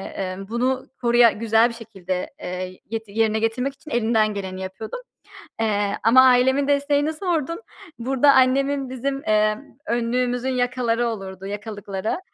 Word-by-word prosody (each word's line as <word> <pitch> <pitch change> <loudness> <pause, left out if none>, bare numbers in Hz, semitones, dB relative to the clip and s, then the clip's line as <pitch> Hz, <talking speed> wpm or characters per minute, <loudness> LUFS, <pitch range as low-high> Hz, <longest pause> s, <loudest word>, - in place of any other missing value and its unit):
emm, 190 0 -5
bunu 255 +2 0 0.2
koruya 240 -1 +5
güzel 225 +1 +3
bir - - -7
şekilde, 195 -6 -5
eee, 185 +1 -5
get 225 0 -4
yerine 220 +1 +1
getirmek 245 +5 -1
için 295 +2 -14
elinden 220 -3 +2
geleni 190 -2 -5
yapıyordum. 190 - -6 0.6
Eee, 205 -2 0
ama 245 +4 +7
ailemin 260 +2 +4
desteğini 285 +1 +1
sordun. 335 0 -2 0.4
Burada 270 +3 +4
annemin 270 +1 +2
bizim, 270 +2 -3
emm, 215 0 +2 0.3
önlüğümüzün 245 +2 0
yakaları 245 -2 0
olurdu, 195 -4 -6
yakalıkları. 205 - -4
230 Hz, 130 wpm, -23 LUFS, 210-260 Hz, 0.6 s, ama